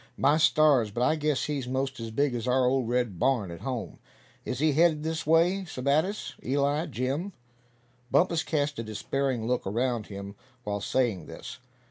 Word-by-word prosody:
"My 145 +2 +4
stars! 155 -7 +4
but 120 +4 -2
I 140 +5 +3
guess 150 -2 0
he's 140 -4 -3
most 135 +1 -2
as 115 0 -5
big 140 +4 +1
as 120 0 -3
our 125 0 +3
old 125 -2 +1
red 120 -7 0
barn 120 -9 +1
at 85 - -9
home. 120 -10 -4 0.5
Is 130 - -3
he 155 +3 +3
heading 160 0 +3
this 160 0 -3
way, 170 +5 +3
Sebattis, 155 +7 -1
Eli, 145 +5 +1
Jim?" 140 +10 -2 0.8
Bumpus 170 0 +3
cast 145 -4 -1
a - - -2
despairing 120 +2 -2
look 125 -3 -1
around 120 +1 -1
him 100 0 -7 0.3
while 105 -2 -3
saying 105 -8 0
this. - - -9
130 Hz, 170 wpm, -28 LUFS, 120-155 Hz, 0.8 s, My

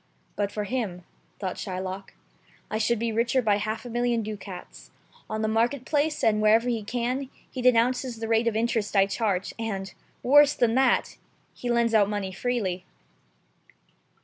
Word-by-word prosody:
"But 200 -1 -1
for 210 - -3
him," 205 -5 -3 0.3
thought 190 -3 -4
Shylock, 190 +1 -5 0.6
"I 215 - -1
should 230 +2 +2
be 230 +1 -1
richer 235 +3 +1
by 210 -4 +2
half 215 +3 -3
a - - -6
million 240 -1 +1
ducats. 200 -4 -8 0.4
On 215 0 -2
the - - +1
market 235 +4 +1
place, 300 +1 0
and 215 -1 +3
wherever 220 +3 +4
he 235 -3 0
can, 245 +5 -2 0.2
he 255 - -4
denounces 250 0 +2
the 225 0 -4
rate 225 +1 +2
of 230 - +1
interest 225 -2 0
I 195 -1 +6
charge, 200 -2 -1
and 195 -4 -4 0.2
— - - -22
^worse 290 +3 +6
than 230 -2 +3
that 260 0 +2 0.2
— - - -39
he 245 - -5
lends 235 -1 +2
out 205 -2 +4
money 205 -2 -2
freely." 190 -4 -2
225 Hz, 175 wpm, -26 LUFS, 205-245 Hz, 0.6 s, I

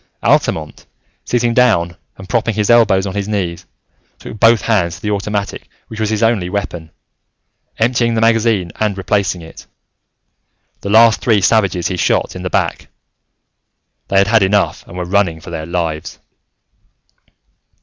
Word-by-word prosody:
Altamont, 75 -1 0 0.4
sitting 120 -1 0
down 100 -9 +2 0.2
and 95 - -11
propping 115 -1 0
his 105 +1 +1
elbows 105 -5 +4
on 95 - -4
his 100 0 -3
knees, 95 -5 -3 0.5
took 110 - -10
both 115 -1 +5
hands 85 -7 0
to 90 - -14
the 105 - -1
automatic 100 0 -3 0.2
which 110 - -8
was 110 -1 0
his 110 0 -1
only 110 -6 +1
weapon, 90 -5 -4 0.9
emptying 115 0 +1
the - - +1
magazine 115 -5 +2
and 105 -2 0
replacing 95 -2 -1
it. 80 - -13 1.1
The 100 - -6
last 115 +2 +5
three 110 -4 +3
savages 95 -3 +1
he 90 - -3
shot - - 0
in - - -6
the - - -3
back: - - -1 1.2
they 95 - 0
had 100 0 +4
had 110 0 +3
enough 100 +1 +1
and 90 - -10
were 90 - -3
running 90 -3 0
for 85 - -11
their 80 -1 -5
lives. 85 -3 -3
100 Hz, 155 wpm, -16 LUFS, 90-110 Hz, 1.2 s, both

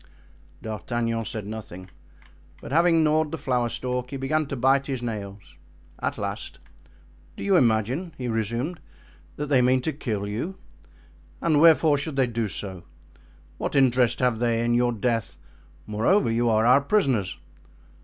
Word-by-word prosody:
D'Artagnan 115 +2 -2
said 105 -1 -5
nothing, 95 -4 -8 0.7
but, - - -10
after - - -1
having 165 -1 +4
gnawed 155 0 +2
the 160 - -3
flower 125 -4 0
stalk, 125 +1 -3
he 140 - -5
began 150 +3 0
to 140 - -4
bite 135 +2 +2
his 130 -3 -3
nails. 100 -6 -6 0.4
At - - -2
last: - - -5 0.8
"Do - - -6
you 195 -1 +3
imagine," 130 - +1
he 125 - -4
resumed, 115 - -2 0.6
"that 150 - -3
they 135 -3 +4
mean 130 +1 +3
to 155 +4 -2
kill 110 -8 -3
you? 125 - -4 0.8
And 155 -3 +2
wherefore 160 -2 +5
should 150 0 -5
they 135 -1 +3
do 115 -2 -2
so? 95 -2 -6 0.8
What - - -3
interest 125 -3 +3
have 125 -3 +1
they 115 -1 +1
in 120 - +1
your 120 0 +2
death? 115 -6 -2 0.5
Moreover, 115 - +2
you 120 +1 +1
are 110 0 +3
our 125 +4 +6
prisoners." 135 - +1
125 Hz, 155 wpm, -25 LUFS, 110-145 Hz, 0.8 s, our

